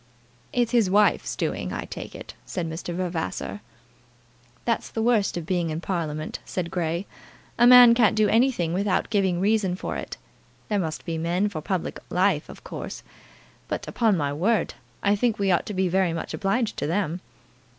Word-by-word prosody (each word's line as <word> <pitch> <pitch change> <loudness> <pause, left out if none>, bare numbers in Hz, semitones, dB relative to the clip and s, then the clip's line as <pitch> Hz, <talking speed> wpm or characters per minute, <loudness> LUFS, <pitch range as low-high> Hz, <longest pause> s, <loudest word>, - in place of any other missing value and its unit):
"It's 240 -2 +1
his 230 -6 +3
wife's 205 +2 +3
doing, - - -2
I - - -4
take - - -8
it," - - -9
said 175 -3 -4
Mr. 160 +2 -5
Vavasor. 170 - -3 1.0
"That's 230 -1 0
the 225 - -2
worst 225 -6 +2
of 170 - -4
being 175 -1 0
in 155 +1 -3
Parliament," 160 -4 -3
said 175 -2 -4
Grey. 170 +1 -1 0.5
"A 240 - +7
man 245 -1 +10
can't 235 -3 +4
do 215 -1 +4
anything 225 -7 +2
without 195 +3 0
giving 190 -4 +2
a - - -2
reason 200 -3 +2
for - - -4
it. - - -6 0.5
There 210 -2 +1
must 160 -4 -3
be 165 -2 -3
men 175 +5 0
for 160 -6 -5
public 185 +2 -3
life, 180 -3 +1
of - - -11
course; - - -7 0.6
but, - - -4
upon 220 -5 +2
my 145 -2 -1
word, 190 +6 +1 0.3
I 200 +1 +4
think 230 +1 +1
we 195 -1 +1
ought 175 - +1
to 210 - -4
be 190 0 +2
very 180 -1 +1
much 165 - -5
obliged 210 +3 0
to - - -2
them." 175 0 -1
185 Hz, 180 wpm, -25 LUFS, 170-210 Hz, 1.0 s, man